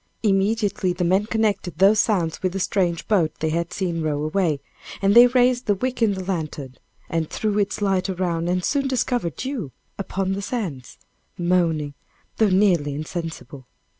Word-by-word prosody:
Immediately 200 -2 +1
the 180 - -2
men 190 +4 +2
connected 210 -7 -1
those 200 +4 +5
sounds 175 -8 +1
with 185 -1 -1
the 195 - -2
strange 175 -3 0
boat 170 -7 +2
they 160 0 -1
had 170 +1 -2
seen 175 -3 -2
row 150 -2 -1
away, 155 -2 0 0.4
and 195 0 +3
they 240 +2 +9
raised 250 0 +2
the 205 - +3
wick 250 +5 -3
in 210 -3 +3
the 190 - -5
lantern, 155 -8 -4 0.3
and 165 -2 -2
threw 210 -1 -1
its 205 0 -1
light 195 -1 +1
around, 175 -2 -1
and 180 0 0
soon 275 -1 0
discovered 245 - -1
you 245 - -4 0.3
upon 195 -1 -2
the 195 - -3
sands, 195 - -5 0.4
moaning, 170 -4 +1 0.4
though 220 -2 +4
nearly 180 -7 +2
insensible. 155 -4 -6
185 Hz, 165 wpm, -23 LUFS, 165-210 Hz, 0.4 s, they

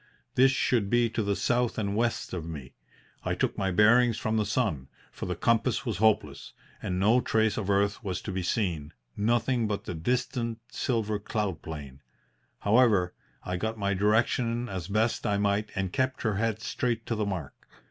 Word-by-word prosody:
This 130 +1 +5
should 120 -6 +1
be 120 0 +3
to 115 - -1
the 100 -1 0
south 120 +2 +1
and 100 -2 -1
west 115 +1 -1
of 90 -3 -3
me. 70 -5 -7 0.5
I - - -1
took - - 0
my 95 -1 0
bearings 115 +4 +5
from 110 0 -1
the 105 -2 +1
sun, 100 - 0 0.2
for - - -6
the - - -2
compass 115 -2 +1
was - - -2
hopeless 95 -10 +1 0.3
and 90 0 -2
no 110 +6 +4
trace 110 -2 +1
of 100 -3 -3
earth 100 +3 +1
was 95 -3 -2
to 105 - -4
be 95 0 -2
seen 85 -5 -1 0.2
nothing 115 +2 +1
but 105 -1 -2
the - - -5
distant 115 +5 -1
silver 110 -5 -1
cloud 100 -5 -2
plain. 70 -4 -8 0.6
However, 105 -5 +4 0.3
I 90 0 -3
got 110 +4 -2
my 100 -1 0
direction 115 +4 +1
as 95 -5 -5
best 110 +3 0
I 100 - +1
might 100 +1 +1
and 95 -2 -2
kept 130 0 0
her 110 -4 0
head 110 0 0
straight 115 -2 -1
to - - -2
the 105 -2 -1
mark. 90 -8 -4
105 Hz, 185 wpm, -28 LUFS, 95-115 Hz, 0.6 s, This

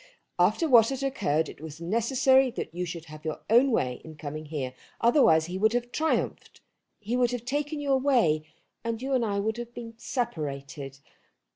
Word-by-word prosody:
"After 210 - +3
what 235 -5 +6
had 270 0 -3
occurred 160 - 0
it - - -11
was 160 0 -8
necessary 255 +8 +3
that 230 - -6
you 180 +1 -2
should 165 -1 -6
have 155 -1 -11
your 155 -1 -4
own 245 +4 +6
way 125 - 0
in 160 -1 -10
coming 155 +1 -6
here. 140 -4 -4 0.3
Otherwise 230 - +5
he 180 +3 -5
would 220 +2 +3
have 245 0 -1
triumphed. 320 +4 -1 0.4
He 215 +3 -3
would 250 -1 +3
have 245 -1 -4
taken 290 +3 -2
you 285 -1 -1
away, 250 - +3 0.4
and 230 -1 -2
you 270 +2 -3
and 255 -2 +2
I 200 -2 0
would 220 +3 -1
have 240 0 -7
been 230 -1 -7
separated. 140 - -4
220 Hz, 185 wpm, -27 LUFS, 160-250 Hz, 0.4 s, what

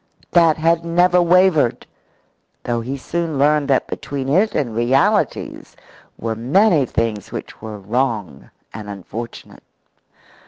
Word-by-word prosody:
That 165 -3 +4
had 165 +1 +1
never 175 +1 +3
wavered, 175 -6 +3 0.8
though 120 -1 -2
he 130 +4 -5
soon 165 +2 -3
learned 145 +1 +2
that 135 -2 +2
between 135 -1 -5
it 190 +9 +2
and 120 -6 -1
realities 120 +4 0 0.4
were 115 0 -3
many 145 - +3
things 110 -3 -2
which - - -8
were 110 -1 -7
wrong 105 - -3 0.2
and 105 -1 -8
unfortunate. 110 +4 -8
135 Hz, 120 wpm, -19 LUFS, 115-165 Hz, 0.8 s, That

